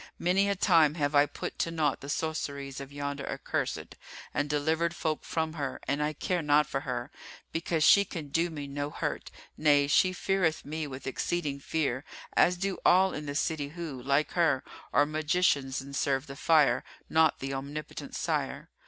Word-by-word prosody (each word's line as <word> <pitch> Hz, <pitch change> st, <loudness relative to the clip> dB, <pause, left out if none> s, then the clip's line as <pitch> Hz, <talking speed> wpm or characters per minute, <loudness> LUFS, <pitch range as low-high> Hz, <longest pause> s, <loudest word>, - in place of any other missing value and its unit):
Many 190 Hz, +3 st, +2 dB
a 200 Hz, -, +1 dB
time 165 Hz, -6 st, +4 dB
have 145 Hz, -2 st, 0 dB
I 145 Hz, 0 st, +5 dB
put -, -, -6 dB
to -, -, +1 dB
naught 160 Hz, -3 st, 0 dB
the 140 Hz, -, -8 dB
sorceries 140 Hz, -3 st, -3 dB
of 135 Hz, 0 st, -9 dB
yonder 140 Hz, 0 st, -4 dB
accursed -, -, -3 dB, 0.4 s
and 145 Hz, 0 st, -1 dB
delivered 160 Hz, +3 st, +1 dB
folk 155 Hz, -3 st, -2 dB
from 160 Hz, -1 st, -2 dB
her, 140 Hz, -5 st, -4 dB
and 140 Hz, +3 st, 0 dB
I 150 Hz, +1 st, 0 dB
care 175 Hz, +4 st, -1 dB
not 150 Hz, 0 st, +4 dB
for 135 Hz, -, -2 dB
her, 125 Hz, -1 st, -4 dB, 0.4 s
because 165 Hz, -1 st, 0 dB
she 200 Hz, +5 st, +7 dB
can 165 Hz, -7 st, -7 dB
do 165 Hz, +4 st, +1 dB
me 150 Hz, -3 st, -6 dB
no 145 Hz, +1 st, -3 dB
hurt: -, -, -3 dB, 0.3 s
nay, 145 Hz, -2 st, +4 dB
she 185 Hz, +6 st, +4 dB
feareth 185 Hz, -3 st, 0 dB
me 155 Hz, +1 st, -3 dB
with 130 Hz, -1 st, -8 dB
exceeding 145 Hz, +1 st, -2 dB
fear, 140 Hz, -3 st, -1 dB, 0.3 s
as 180 Hz, +1 st, +4 dB
do 195 Hz, +1 st, -2 dB
all 190 Hz, +1 st, +5 dB
in 150 Hz, 0 st, -5 dB
the 145 Hz, -, -4 dB
city 155 Hz, -1 st, 0 dB
who, 155 Hz, -4 st, -6 dB
like 140 Hz, +4 st, +1 dB
her, 165 Hz, -7 st, +2 dB, 0.3 s
are 145 Hz, -, +4 dB
magicians 155 Hz, -3 st, +1 dB
and 140 Hz, +1 st, -8 dB
serve 135 Hz, 0 st, 0 dB
the 135 Hz, -, -9 dB
fire, 145 Hz, -5 st, +4 dB, 0.2 s
not 160 Hz, -1 st, +3 dB
the 135 Hz, 0 st, -4 dB
Omnipotent 140 Hz, +3 st, -6 dB
Sire. -, -, -2 dB
150 Hz, 180 wpm, -29 LUFS, 140-165 Hz, 0.4 s, she